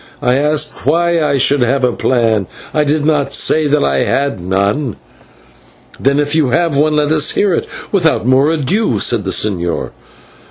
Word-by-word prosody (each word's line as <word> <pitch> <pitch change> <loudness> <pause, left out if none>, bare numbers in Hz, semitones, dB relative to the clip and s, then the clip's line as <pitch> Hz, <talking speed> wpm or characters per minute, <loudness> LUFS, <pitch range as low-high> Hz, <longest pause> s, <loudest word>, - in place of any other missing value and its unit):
I 125 +1 +2
asked 150 +2 -1
why 170 +2 +2
I 145 -2 +1
should 140 +2 +2
have 130 +2 0
a 125 - +3
plan? 115 -6 0 0.3
I 150 - +2
did 150 0 0
not 150 -3 0
say 155 -1 +2
that 145 +1 +1
I 70 -1 0
had 140 -7 -1
none." 100 +7 -1 1.0
"Then 140 +1 +1
if 145 0 -1
you 155 -3 +2
have 165 +3 0
one, 150 +2 +2
let 150 0 +1
us 155 -1 +2
hear 200 -3 0
it - - -2 0.2
without 165 - +1
more 130 +3 +3
ado," 165 - 0
said 115 -5 0
the - - -2
señor. 90 -4 -1
145 Hz, 175 wpm, -14 LUFS, 120-155 Hz, 1.0 s, a